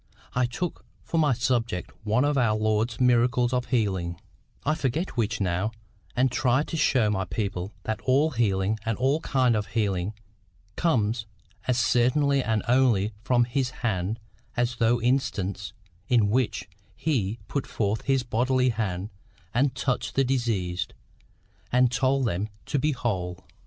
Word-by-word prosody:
I 125 Hz, 0 st, +2 dB
took 160 Hz, +9 st, -4 dB, 0.2 s
for 165 Hz, -, -1 dB
my 150 Hz, -4 st, +4 dB
subject 115 Hz, -6 st, -1 dB
one 110 Hz, +6 st, +2 dB
of 145 Hz, 0 st, +1 dB
our 120 Hz, -5 st, +3 dB
Lord's 110 Hz, +1 st, 0 dB
miracles 125 Hz, 0 st, +3 dB
of 125 Hz, -1 st, 0 dB
healing, 95 Hz, -8 st, 0 dB, 0.5 s
I 155 Hz, -, +3 dB
forget 155 Hz, +3 st, -1 dB
which 115 Hz, -3 st, 0 dB
now, 95 Hz, +3 st, 0 dB, 0.4 s
and 125 Hz, +1 st, +3 dB
tried 130 Hz, +3 st, +2 dB
to -, -, -3 dB
show 125 Hz, -8 st, +3 dB
my 95 Hz, -2 st, -1 dB
people 100 Hz, -1 st, -3 dB
that 110 Hz, 0 st, -3 dB
all 140 Hz, +5 st, +3 dB
healing 105 Hz, -4 st, +1 dB
and 115 Hz, -2 st, -1 dB
all 135 Hz, +4 st, +2 dB
kinds 130 Hz, -6 st, +2 dB
of 105 Hz, -2 st, -1 dB
healing 100 Hz, -1 st, 0 dB, 0.6 s
come 115 Hz, -11 st, +2 dB, 0.5 s
as 125 Hz, -2 st, +2 dB
certainly 130 Hz, +3 st, +3 dB
and 110 Hz, -2 st, 0 dB
only 120 Hz, -5 st, +3 dB
from 120 Hz, +1 st, +3 dB
His 125 Hz, +1 st, 0 dB, 0.2 s
hand 100 Hz, +1 st, -1 dB, 0.4 s
as 120 Hz, 0 st, 0 dB
those 115 Hz, +1 st, +2 dB
instances 100 Hz, -8 st, 0 dB, 0.4 s
in 110 Hz, -5 st, +3 dB
which 125 Hz, -5 st, 0 dB, 0.3 s
He 115 Hz, -9 st, 0 dB
put 140 Hz, -, -2 dB
forth 105 Hz, 0 st, -1 dB
His 135 Hz, -1 st, +2 dB
bodily 125 Hz, +2 st, +2 dB
hand 105 Hz, -4 st, -2 dB, 0.4 s
and 130 Hz, +2 st, +2 dB
touched 130 Hz, -1 st, -1 dB
the 135 Hz, -, +4 dB
diseased, 115 Hz, -9 st, -1 dB, 0.8 s
and 125 Hz, 0 st, +4 dB
told 135 Hz, +1 st, +2 dB
them 105 Hz, 0 st, -1 dB, 0.2 s
to 145 Hz, -, 0 dB
be 150 Hz, +3 st, +2 dB
whole. 95 Hz, -9 st, -2 dB
120 Hz, 150 wpm, -26 LUFS, 105-130 Hz, 0.8 s, my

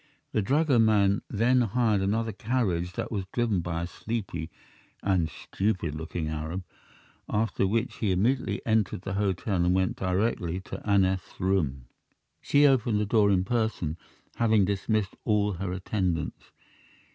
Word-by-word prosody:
The 110 Hz, -, +1 dB
dragoman 110 Hz, -6 st, +3 dB
then 125 Hz, +4 st, +3 dB
hired 110 Hz, -2 st, +2 dB
another 110 Hz, +3 st, 0 dB
carriage 100 Hz, -6 st, -1 dB
that -, -, -4 dB
was 100 Hz, -4 st, -2 dB
driven 115 Hz, -6 st, +1 dB
by 85 Hz, -1 st, -3 dB
a -, -, -1 dB
sleepy 95 Hz, -5 st, -4 dB, 0.5 s
and 90 Hz, -5 st, +2 dB
stupid 95 Hz, -4 st, -2 dB
looking 80 Hz, +1 st, -4 dB
Arab, 80 Hz, +4 st, -4 dB, 0.7 s
after 105 Hz, -2 st, +1 dB
which 115 Hz, +4 st, -1 dB
he 105 Hz, -4 st, 0 dB
immediately 115 Hz, +9 st, 0 dB
entered 110 Hz, -5 st, +1 dB
the 100 Hz, -, -4 dB
hotel 100 Hz, 0 st, 0 dB
and 90 Hz, +1 st, +3 dB
went 95 Hz, -1 st, +1 dB
directly 95 Hz, -2 st, 0 dB
to -, -, -8 dB
Aneth's 95 Hz, -3 st, +1 dB
room. 80 Hz, -9 st, 0 dB, 0.6 s
She 145 Hz, +1 st, +4 dB
opened 120 Hz, -6 st, +3 dB
the 105 Hz, -, +1 dB
door 105 Hz, -1 st, +3 dB
in 95 Hz, -2 st, +3 dB
person, 110 Hz, -8 st, -1 dB, 0.4 s
having 110 Hz, -4 st, +4 dB
dismissed 100 Hz, +1 st, -1 dB
all 105 Hz, -1 st, +2 dB
her 95 Hz, +1 st, -4 dB
attendants. 90 Hz, -3 st, -2 dB
100 Hz, 140 wpm, -27 LUFS, 90-110 Hz, 0.7 s, She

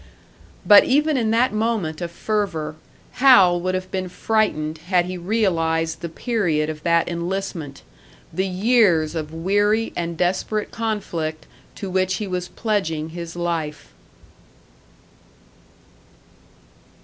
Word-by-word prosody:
But 205 Hz, -1 st, +9 dB
even 300 Hz, +3 st, +2 dB
in 230 Hz, -4 st, +1 dB
that 230 Hz, +1 st, +2 dB
moment 215 Hz, -8 st, -1 dB
of 175 Hz, -, -3 dB
fervour, 170 Hz, -5 st, -2 dB, 0.5 s
Hal 190 Hz, -10 st, +6 dB
would 185 Hz, +1 st, -1 dB
have 185 Hz, 0 st, -5 dB
been 185 Hz, -1 st, -3 dB
frightened 170 Hz, -7 st, -1 dB
had 175 Hz, +1 st, +1 dB
he 185 Hz, +1 st, -5 dB
realised 165 Hz, -5 st, 0 dB
the 170 Hz, -, -4 dB
period 160 Hz, -6 st, -1 dB
of 155 Hz, -1 st, -10 dB
that 170 Hz, 0 st, +2 dB
enlistment, 170 Hz, -4 st, -4 dB, 0.5 s
the 190 Hz, +1 st, 0 dB
years 185 Hz, -5 st, +3 dB
of 155 Hz, -2 st, -4 dB
weary 205 Hz, +6 st, +1 dB
and 170 Hz, -1 st, -3 dB
desperate 190 Hz, +4 st, -1 dB
conflict 175 Hz, -8 st, -3 dB, 0.3 s
to 200 Hz, -, -6 dB
which 185 Hz, 0 st, +1 dB
he 210 Hz, -, -3 dB
was 180 Hz, -2 st, -3 dB
pledging 165 Hz, -9 st, -2 dB
his 170 Hz, 0 st, -7 dB
life. 165 Hz, -4 st, -3 dB
180 Hz, 120 wpm, -22 LUFS, 165-210 Hz, 0.5 s, But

